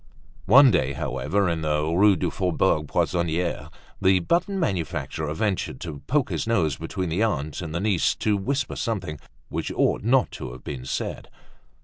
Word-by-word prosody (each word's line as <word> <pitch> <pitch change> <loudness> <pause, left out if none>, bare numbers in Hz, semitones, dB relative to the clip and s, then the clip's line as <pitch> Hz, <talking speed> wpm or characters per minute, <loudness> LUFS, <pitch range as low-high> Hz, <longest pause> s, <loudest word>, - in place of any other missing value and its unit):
One 135 -1 +8
day, 65 -7 +1
however, 75 +7 -1
in 85 -2 -1
the 75 -1 0
Rue 95 +5 +4
du 80 - -1
Faubourg 75 -1 +1
Poissonniere 85 -2 -1 0.3
the 95 0 +5
button 180 - 0
manufacturer 80 - -2
ventured 95 -8 -1
to 75 -5 -6
poke 145 -1 +1
his - - -2
nose 85 -11 +2
between 90 -2 -4
the 85 +6 -1
aunt 80 -10 -1
and 80 -3 -5
the - - 0
niece 100 -3 +1
to 105 -1 +1
whisper 130 +8 -2
some 115 -3 -1
things 75 -6 -7 0.3
which - - -3
ought - - +1
not 125 +4 +2
to 65 -4 -7
have 60 - -12
been 65 -3 -6
said. - - -4
85 Hz, 170 wpm, -25 LUFS, 75-105 Hz, 0.3 s, One